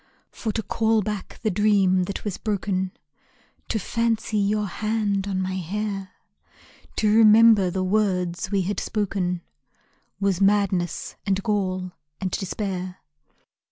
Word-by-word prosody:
For 220 - -3
to 220 - -2
call 220 0 +1
back 210 -2 -5
the 215 - +2
dream 195 -2 +3
that 200 - -6
was 205 -3 -3
broken, 190 -3 -1 0.8
To - - -1
fancy 225 +1 -1
your 210 +1 +1
hand 205 0 -1
on 190 -2 -1
my 185 0 -2
hair, 195 +1 -4 0.8
To 210 -1 +2
remember 220 -3 +7
the 185 +1 -1
words 185 -3 0
we 195 -2 +1
had 200 +3 -2
spoken, 185 -4 -2 0.8
Was 195 -2 +1
madness, 195 -3 +1
and 195 0 +1
gall, 185 -4 -1 0.3
and 185 -2 -2
despair. 185 -1 -3
200 Hz, 125 wpm, -24 LUFS, 185-215 Hz, 0.8 s, remember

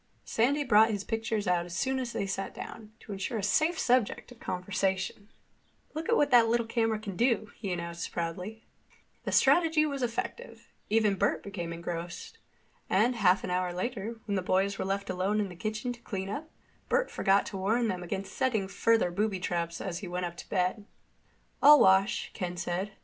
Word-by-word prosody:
Sandy 280 +6 +2
brought 220 -3 +5
his 205 -3 -2
pictures 225 -2 -2
out 175 -1 +2
as 175 0 -6
soon 265 +4 0
as 250 -2 -3
they - - -3
had 195 - -2
sat 195 +1 -4
down, 215 -1 -8
to - - -10
ensure 200 +4 -3
a 205 - -3
safe 315 - +2
subject 250 -3 +1
of 245 - -14
conversation. 190 +2 -2 0.6
"Look 315 +1 -4
what 295 -12 +3
that 235 -2 +7
little 235 0 +1
camera 225 -1 +1
can 210 -3 -6
do," 230 0 +1
he 200 -4 -3
announced 170 -1 -4
proudly. 180 +7 -4 0.6
The - - -1
strategy 320 -3 +4
was 280 -3 -3
effective. 245 - -4 0.2
Even 215 -2 +3
Bert 200 - +1
became 175 -4 -5
engrossed. 170 - -6 0.5
And 225 +6 +3
half 190 -3 +4
an 180 - -3
hour 180 0 0
later, 225 +4 -4
when 205 - -2
the 190 - +1
boys 195 +2 +1
were - - -1
left 195 +1 -2
alone 190 +3 0
in 205 -2 -1
the 180 - -10
kitchen 215 +6 -3
to 240 - -15
clean 195 -4 -4
up, 300 +10 -5 0.4
Bert - - +1
forgot 195 0 +3
to 195 - -6
warn 225 +5 +1
them 185 -4 -2
against 190 +2 -5
setting 235 -7 0
further 225 -1 +2
booby 200 +1 0
traps 170 -2 -2
as 175 -3 -4
he 195 - -7
went 180 +1 -2
up 170 0 -5
to - - -10
bed. 185 +3 0 0.8
"I'll 295 +1 +9
wash," 190 +1 +4
Ken 180 -1 -4
said. 185 +3 -3
205 Hz, 195 wpm, -29 LUFS, 185-235 Hz, 0.8 s, I'll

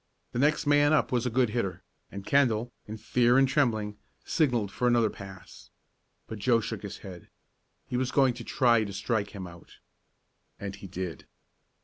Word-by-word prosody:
The 120 - -3
next 150 +3 +2
man 145 +1 +4
up 155 - +2
was 125 -1 +1
a - - +1
good 125 0 +2
hitter, 100 -5 -2 0.3
and 100 0 -8
Kendall, 120 -4 +2 0.2
in 110 +1 -6
fear 120 +3 +3
and 135 0 +5
trembling, 110 -7 0 0.3
signalled 120 - +1
for 125 - 0
another 120 -3 +3
pass. 95 -1 -12 0.6
But 110 - -7
Joe 115 +3 +3
shook 110 -1 -5
his 100 - -7
head. 90 -3 -10 0.6
He 125 - -3
was 130 0 0
going 135 -3 +4
to 120 0 -8
try 120 -4 +3
to 100 -2 -6
strike 105 +1 -2
him 95 -2 -6
out. 85 -1 -13 0.8
And 100 -1 -5
he 100 -1 -10
did. 90 -4 -6
115 Hz, 175 wpm, -28 LUFS, 100-125 Hz, 0.8 s, and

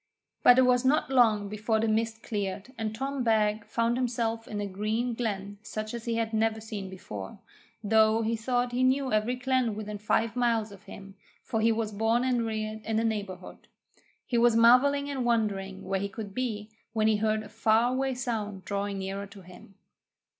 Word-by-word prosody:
But 245 - +7
it 260 - +6
was 250 0 +3
not 270 +1 +2
long 220 -6 +4
before 215 +2 -1
the 225 - +1
mist 220 +1 -1
cleared, 205 +3 -4
and 220 -1 -3
Tom 270 +2 -2
Beg 215 -2 +2
found 230 +1 0
himself 230 -2 -1
in 210 - -4
a 205 - -2
green 215 +5 -2
glen 205 -3 -4
such 215 0 -5
as 235 -1 -6
he 230 -1 -1
had 225 -1 -1
never 220 0 +1
seen 210 -3 -6
before, 105 - -8 0.5
though 220 +1 +4
he 225 +1 0
thought 245 +2 -1
he 245 +1 -1
knew 260 -1 +2
every 215 +4 +1
glen 255 -3 0
within 210 -1 -6
five 220 +2 0
miles 230 -3 +1
of 200 0 -14
him, 195 0 -11 0.3
for 225 -4 -2
he 225 +1 +4
was 220 -1 -1
born 225 +3 +1
and 245 -3 +1
reared 215 0 -3
in 220 0 -1
the 225 - +2
neighbourhood. 200 -5 -4 0.6
He 240 - 0
was 235 -1 +4
marvelling 260 +5 +5
and 275 -3 -2
wondering 200 -5 -1
where 195 0 -1
he 200 +1 -3
could 200 0 -7
be, 220 -4 -3 0.2
when 215 -1 +2
he 220 -1 +3
heard 215 0 0
a 210 - -11
far 225 +2 +2
away 265 0 0
sound 215 -7 -4
drawing 200 0 -2
nearer 195 +1 -4
to 200 0 -13
him. 180 +2 -15
220 Hz, 195 wpm, -28 LUFS, 210-240 Hz, 0.6 s, But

